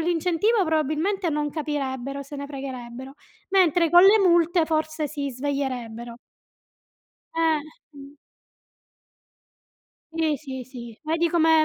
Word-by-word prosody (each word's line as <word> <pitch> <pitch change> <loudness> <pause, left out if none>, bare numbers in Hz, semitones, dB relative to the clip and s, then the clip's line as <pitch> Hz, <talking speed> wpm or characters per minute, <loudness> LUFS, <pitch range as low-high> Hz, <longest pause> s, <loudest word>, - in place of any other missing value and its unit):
l'incentivo, 350 +5 +1
probabilmente, 320 +5 0
non 295 -1 -1
capirebbero, 275 -3 -3
se 280 - -10
ne 280 0 -5
fregherebbero, 265 -1 -7 0.4
mentre 350 -3 +3
con 350 0 +8
le 400 +3 +7
multe, 345 -3 +4
forse, 315 -1 -1
si 285 -1 -4
sveglierebbero. 250 -4 -4 1.2
Eh, 325 -1 +3 0.4
mh. 280 +1 -12 2.0
Sì, 320 -2 +1
sì, 265 -2 -7
sì. 240 -3 -10
Vedi 325 +2 0
come 320 -1 +4
305 Hz, 110 wpm, -24 LUFS, 270-330 Hz, 2.0 s, con